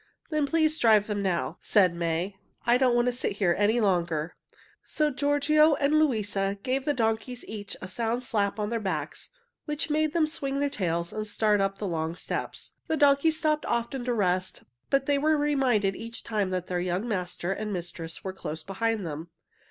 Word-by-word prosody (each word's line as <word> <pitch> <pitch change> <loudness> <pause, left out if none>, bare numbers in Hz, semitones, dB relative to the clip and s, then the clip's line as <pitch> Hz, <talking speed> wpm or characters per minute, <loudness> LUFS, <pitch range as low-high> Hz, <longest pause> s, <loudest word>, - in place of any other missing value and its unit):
"Then 305 -2 +1
please 315 0 +2
drive 215 -3 +5
them 210 -1 -2
now," 170 -5 -1
said 185 -5 +4
May. 170 +3 -2 0.3
"I 240 +1 +4
don't 255 -2 +4
want 240 0 +3
to 250 - +2
sit 245 -3 -2
here 195 -4 +2
any 210 +4 +2
longer." 170 -6 0 0.5
So 300 -1 0
Giorgio 290 +2 +3
and 280 +1 +1
Luisa 205 -8 0
gave 265 +1 -1
the 295 - +2
donkeys 225 +1 -1
each 205 -2 -6
a - - -4
sound 230 +5 -2
slap 205 -3 0
on 210 +1 -2
their 230 - 0
backs, 195 -3 -4 0.4
which 300 0 -3
made 310 0 +1
them 330 -2 +3
swing 280 -3 -2
their 285 0 0
tails 170 -7 -2
and 215 0 -3
start 210 -1 +2
on - - +4
up 195 0 -4
the 210 - -4
long 165 -2 -2
steps. - - -5 0.2
The 320 - 0
donkeys 290 +2 +4
stopped 305 -1 0
often 235 +2 -1
to 250 - 0
rest, 185 -3 0 0.3
but 275 -1 +2
they 285 0 +2
were 310 +2 +3
reminded 260 -9 +2
each 230 +1 -7
time 210 -4 -1
that 185 -1 -2
their 180 -1 -2
young 180 +5 -1
master 180 -3 -2
and 210 +2 -4
mistress 170 -3 -5
were 190 - -4
close 160 -4 -6
behind 210 +2 -1
them. 160 +1 -6
220 Hz, 195 wpm, -27 LUFS, 185-275 Hz, 0.5 s, drive